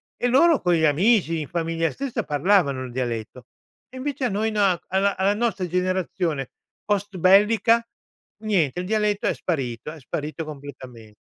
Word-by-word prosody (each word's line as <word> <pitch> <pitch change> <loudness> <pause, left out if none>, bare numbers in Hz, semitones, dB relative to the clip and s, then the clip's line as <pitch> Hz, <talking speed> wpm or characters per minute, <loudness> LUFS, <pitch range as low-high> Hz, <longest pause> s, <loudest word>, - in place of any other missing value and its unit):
e 245 - -1
loro 315 +4 +4
con 175 -1 +2
gli 160 -1 +2
amici, 165 +1 +2
in 145 - -6
famiglia 165 -1 -1
stessa 275 -3 -4
parlavano 145 -4 +1
il 125 - -9
dialetto. 120 -1 -4 0.4
E 260 - -11
invece 275 0 -4
a - - +1
noi 215 +3 0
na 205 -3 +3
a 190 +3 -1
alla 195 +2 +2
nostra 210 -5 -1
generazione 180 -5 -2 0.3
postbellica, 205 +4 +3 0.6
niente, 175 -8 +1
il 180 - -3
dialetto 210 0 0
è - - +2
sparito 135 -5 -3
è 160 - -11
sparito 150 +5 -5
completame 130 -7 -11
180 Hz, 155 wpm, -23 LUFS, 145-210 Hz, 0.6 s, loro